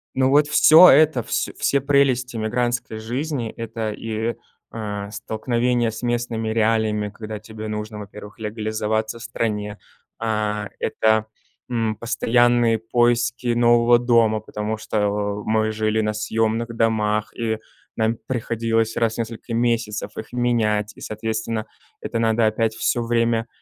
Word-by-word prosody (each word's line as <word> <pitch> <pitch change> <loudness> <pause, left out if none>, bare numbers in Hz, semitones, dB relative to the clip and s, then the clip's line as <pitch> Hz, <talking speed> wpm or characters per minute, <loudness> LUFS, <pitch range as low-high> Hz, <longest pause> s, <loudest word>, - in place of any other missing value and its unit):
Ну, 130 0 +3
вот 145 +1 +4
всё 160 +4 +8
это, 145 -4 +5
вс - - -1
все 140 - +2
прелести 130 -3 +2
эмигрантской 120 0 -1
жизни- 125 +1 -3
это 115 -1 -4
и, 115 +1 -3 0.4
э, 105 -2 -5
столкновение 120 +3 0
с 110 - -8
местными 120 -2 -2
реалиями, 110 -2 +1
когда 110 0 -7
тебе 110 0 -8
нужно, 105 0 -5
во-первых, 105 +1 -10
легализоваться 110 +1 -2
в - - -9
стране. 105 -3 -3 0.4
А, 105 -2 -1
это, 110 0 +1 0.4
м, 115 -2 -1
постоянные 120 0 +2
поиски 120 +1 +1
нового 120 0 +4
дома, 115 -3 +3
потому 105 +1 -4
что 110 0 -4 0.4
о 105 - -8
мы 110 0 +1
жили 110 0 0
на 105 0 -1
съемных 115 +2 -1
домах, 110 -2 0
и 110 -2 -1 0.4
нам 110 0 0
приходилось 115 -2 -1
раз 115 -1 +1
в - - -10
несколько 115 +1 -5
месяцев 115 -3 -1
их 110 +2 -8
менять, 110 -4 +1
и, - - -15
соответственно, 110 0 -3 0.4
это 115 - -3
надо 115 0 +2
опять 110 0 0
всё 120 +2 0
время 115 0 +1
115 Hz, 135 wpm, -22 LUFS, 110-120 Hz, 0.4 s, всё